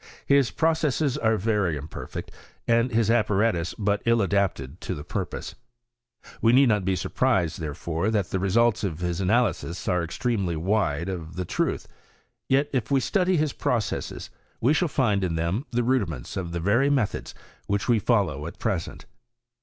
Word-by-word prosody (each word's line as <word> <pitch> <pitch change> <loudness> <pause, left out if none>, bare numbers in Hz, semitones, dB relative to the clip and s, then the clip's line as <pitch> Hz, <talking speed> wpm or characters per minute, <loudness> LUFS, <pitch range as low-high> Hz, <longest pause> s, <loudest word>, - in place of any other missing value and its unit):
His 140 -3 +4
processes 155 -4 +1
are 110 -1 +2
very 100 -6 0
imperfect, 75 +2 -7 0.4
and 115 +1 +3
his 115 -2 +2
apparatus 105 -5 +1
but 100 -1 0
ill 115 0 +4
adapted 95 -9 -1
to - - -3
the 75 - -7
purpose. - - -4 0.9
We 115 +1 +4
need 135 0 +6
not 105 -3 +2
be 95 0 +1
surprised, 90 -4 0
therefore, 80 +4 -2
that 105 -5 0
the 95 - 0
results 110 +4 +2
of 85 -4 -3
his 90 0 -1
analyses 95 -4 0
are 90 -1 +1
extremely 95 0 -1
wide 85 -2 0
of 85 -3 -5
the 90 0 -3
truth. - - -1 0.6
Yet, 140 +2 +3
if 125 -5 -1
we 140 -1 +3
study 185 - +1
his 150 -2 0
processes, 115 -4 -2 0.3
we 130 +6 +3
shall 175 +2 +2
find 110 -9 +1
in 85 -3 -1
them 85 - -1
the 120 0 0
rudiments 100 - -1
of 90 -3 -4
the 85 - -3
very 115 +11 +3
methods 135 -8 -1 0.3
which 100 0 -1
we 120 -3 +4
follow 95 - +1
at - - -9
present. 95 -7 -3
105 Hz, 165 wpm, -25 LUFS, 85-120 Hz, 0.9 s, need